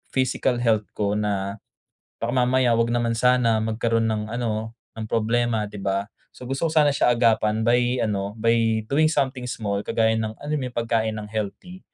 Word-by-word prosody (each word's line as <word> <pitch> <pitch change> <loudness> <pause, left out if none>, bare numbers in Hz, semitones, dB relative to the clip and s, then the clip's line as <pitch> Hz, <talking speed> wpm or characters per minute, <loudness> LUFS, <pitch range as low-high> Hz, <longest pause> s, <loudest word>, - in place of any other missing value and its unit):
physical 130 -1 +1
health 110 -3 +2
ko 100 -1 0
na 100 -1 -2 0.6
baka 115 +1 -2
mamaya, 125 -1 +2
'wag 115 +1 +1
naman 120 -1 0
sana, 115 -1 +3
magkaroon 115 +1 0
ng 110 0 -2
ano 110 -2 -2 0.2
ng 110 - -5
problema, 115 -1 +1
'di 100 -1 -9
ba? 100 +1 -1 0.3
So - - -11
gusto 135 +6 -1
ko - - -3
sana 150 -2 +5
siya 125 -3 +2
agapan 110 -2 +2
by 120 +2 +2
ano, 100 -1 -2
by 115 -1 +1
doing 155 +2 +4
something 130 -5 -1
small, 100 -4 -2
kagaya 110 0 +2
ng, 110 -1 -3
alam 150 +1 -4
mo - - -4
'yun, 120 - -12
pagkain 115 -1 0
ng 105 0 -7
healthy. 110 - -5
115 Hz, 180 wpm, -23 LUFS, 110-125 Hz, 0.6 s, sana